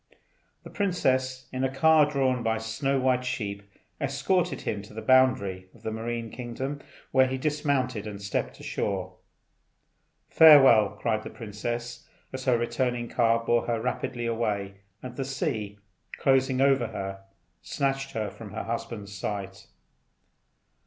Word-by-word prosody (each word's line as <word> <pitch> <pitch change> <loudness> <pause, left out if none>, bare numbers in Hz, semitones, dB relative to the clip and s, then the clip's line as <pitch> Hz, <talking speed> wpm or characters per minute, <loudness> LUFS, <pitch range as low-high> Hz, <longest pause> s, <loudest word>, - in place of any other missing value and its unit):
The - - -11
princess, 130 -10 0
in 130 0 -2
a 130 - +2
car 150 +2 +4
drawn 130 -3 +1
by 115 -1 0
snow 115 +5 -1
white 130 -1 +2
sheep, 105 -5 -3 0.4
escorted 150 +7 0
him 105 - -3
to 105 +1 -14
the 110 - -5
boundary 110 -8 +3
of - - -19
the 110 - -3
marine 115 0 -4
kingdom, 130 +4 -5 0.3
where 130 0 +5
he 130 0 -2
dismounted 135 -6 -1
and 100 -1 -6
stepped 100 0 -3
ashore. 95 -2 -3 1.1
"Farewell!" 135 -10 +7
cried 110 -2 0
the - - -8
princess, 120 +2 -5 0.3
as 130 0 -5
her 125 -3 +4
returning 120 0 -1
car 115 -1 +2
bore 120 0 +2
her 115 -1 0
rapidly 120 0 -3
away, 105 -4 -2 0.3
and 125 -1 -7
the 135 - -2
sea, 130 - -3 0.4
closing 130 -1 +2
over 135 -3 +3
her, 95 -1 -6 0.4
snatched 135 0 -2
her 105 -3 -2
from 105 -4 -11
her - - -4
husband's 110 -3 -5
sight. 95 0 -5
120 Hz, 140 wpm, -27 LUFS, 110-135 Hz, 1.1 s, Farewell